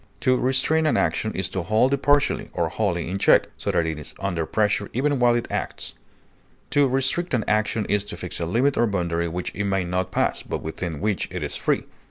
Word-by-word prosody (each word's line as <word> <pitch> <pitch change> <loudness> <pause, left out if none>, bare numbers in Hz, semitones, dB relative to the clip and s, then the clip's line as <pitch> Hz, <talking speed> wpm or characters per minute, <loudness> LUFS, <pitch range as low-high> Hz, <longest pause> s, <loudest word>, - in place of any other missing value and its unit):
To 130 - +3
restrain 135 +5 +2
an - - +2
action 90 +6 0
is 95 - -1
to 95 - -2
hold 110 +9 +2
it 140 - 0
partially 145 0 +2
or 80 - 0
wholly 90 -3 -1
in 95 +3 -3
check, - - +5
so - - -4
that 85 - +2
it 80 -1 -3
is 75 - -7
under 85 -5 -2
pressure 105 +1 +1
even 140 +2 +1
while 120 -1 +4
it 120 - -1
acts; - - -3 0.8
to 145 -1 +4
restrict 135 +5 +1
an 115 - 0
action 110 0 +1
is 105 0 +1
to - - -7
fix - - -5
a 85 - -2
limit 130 +10 +2
or 120 - +3
boundary 85 -4 -1
which 90 +2 -4
it 105 - -2
may 95 -1 +1
not 90 +1 -2
pass, - - 0
but - - -5
within 80 0 -4
which 105 -2 0
it - - -4
is - - -3
free. - - 0
105 Hz, 225 wpm, -24 LUFS, 90-130 Hz, 0.8 s, check